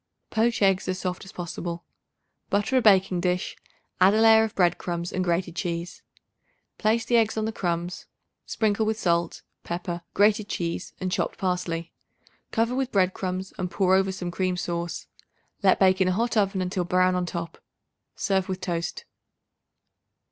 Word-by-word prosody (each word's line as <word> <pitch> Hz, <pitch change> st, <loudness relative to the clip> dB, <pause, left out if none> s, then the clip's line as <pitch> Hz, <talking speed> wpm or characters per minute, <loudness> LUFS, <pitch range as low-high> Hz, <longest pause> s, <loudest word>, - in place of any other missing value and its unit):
Poach 225 Hz, -1 st, +1 dB
eggs 195 Hz, -1 st, +3 dB
as 185 Hz, 0 st, -1 dB
soft 185 Hz, 0 st, -4 dB
as 190 Hz, -, -11 dB
possible. 170 Hz, 0 st, -5 dB, 0.7 s
Butter 205 Hz, +6 st, +1 dB
a 255 Hz, -, +5 dB
baking 190 Hz, -4 st, +4 dB
dish; 180 Hz, 0 st, -1 dB, 0.4 s
add 190 Hz, +3 st, +6 dB
a -, -, +3 dB
layer 220 Hz, 0 st, +7 dB
of 220 Hz, -, -3 dB
bread 175 Hz, -2 st, +2 dB
crumbs 170 Hz, 0 st, -4 dB
and 185 Hz, -, 0 dB
grated 175 Hz, -1 st, -1 dB
cheese. 170 Hz, 0 st, -4 dB, 0.8 s
Place 225 Hz, +1 st, +2 dB
the 240 Hz, 0 st, +3 dB
eggs 220 Hz, -1 st, +2 dB
on 215 Hz, -, 0 dB
the 220 Hz, -, -1 dB
crumbs; 175 Hz, -3 st, -3 dB, 0.4 s
sprinkle 215 Hz, -1 st, +1 dB
with 220 Hz, 0 st, 0 dB
salt, 170 Hz, -3 st, 0 dB, 0.2 s
pepper, 175 Hz, 0 st, -4 dB
grated 210 Hz, +1 st, +3 dB
cheese 170 Hz, -4 st, -3 dB
and 185 Hz, -1 st, -2 dB
chopped -, -, -1 dB
parsley. 180 Hz, -3 st, -2 dB, 0.6 s
Cover 230 Hz, +2 st, 0 dB
with 265 Hz, 0 st, -1 dB
bread 190 Hz, -2 st, +2 dB
crumbs 185 Hz, 0 st, -4 dB
and 180 Hz, -, -2 dB
pour 190 Hz, 0 st, +2 dB
over 190 Hz, 0 st, +3 dB
some 180 Hz, -2 st, -5 dB
cream 185 Hz, 0 st, -1 dB
sauce. 170 Hz, -1 st, -3 dB, 0.6 s
Let 195 Hz, -2 st, +4 dB
bake 190 Hz, 0 st, +4 dB
in 185 Hz, -, +4 dB
a 185 Hz, -, +2 dB
hot 235 Hz, +5 st, 0 dB
oven 195 Hz, -3 st, +1 dB
until 180 Hz, 0 st, -1 dB
brown 185 Hz, +1 st, +3 dB
on 180 Hz, -1 st, -1 dB
top. 170 Hz, -1 st, -5 dB, 0.6 s
Serve 190 Hz, -2 st, 0 dB
with 185 Hz, -1 st, -2 dB
toast. 180 Hz, -, -3 dB
185 Hz, 170 wpm, -26 LUFS, 175-205 Hz, 0.8 s, layer